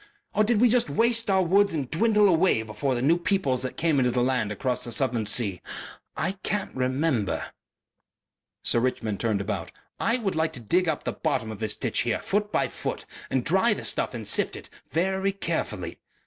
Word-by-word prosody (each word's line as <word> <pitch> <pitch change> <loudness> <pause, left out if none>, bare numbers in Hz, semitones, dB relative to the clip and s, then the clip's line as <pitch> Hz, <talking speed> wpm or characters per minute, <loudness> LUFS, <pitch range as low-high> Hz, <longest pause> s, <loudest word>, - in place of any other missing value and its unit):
Or 215 - +3
did 220 0 +2
we 245 - +6
just 240 -6 +3
waste 230 +8 +1
our 190 -1 +4
woods 200 +1 +3
and 140 -4 -2
dwindle 210 +4 +4
away 165 - +3
before 110 +5 -2
the 120 - -2
new 165 +5 +4
peoples 175 -9 +1
that 130 0 -3
came 160 -4 +2
into 125 -1 +3
the 125 0 +1
land 125 -5 0
across 125 +4 -1
the 120 - -4
southern 120 -5 0
sea? 105 -5 0 0.6
I 195 0 -2
can't 205 +1 -2
remember...." 130 - 0 1.1
Sir 120 - +2
Richmond 115 -4 -1
turned 110 -4 0
about. 100 -4 -4 0.3
"I 230 +2 +2
would 210 -6 -2
like 160 0 0
to - - -2
dig 170 - +2
up 155 - -2
the - - -2
bottom 125 -8 -1
of 105 - -8
this 110 -1 -1
ditch - - -1
here - - +1
foot 205 +1 -1
by - - +1
foot - - -4 0.2
and - - 0
dry - - +3
the - - -6
stuff - - -1
and - - -5
sift - - +1
it - - -11 0.2
very 190 +3 +1
carefully.... 110 - -3
145 Hz, 200 wpm, -26 LUFS, 120-195 Hz, 1.1 s, we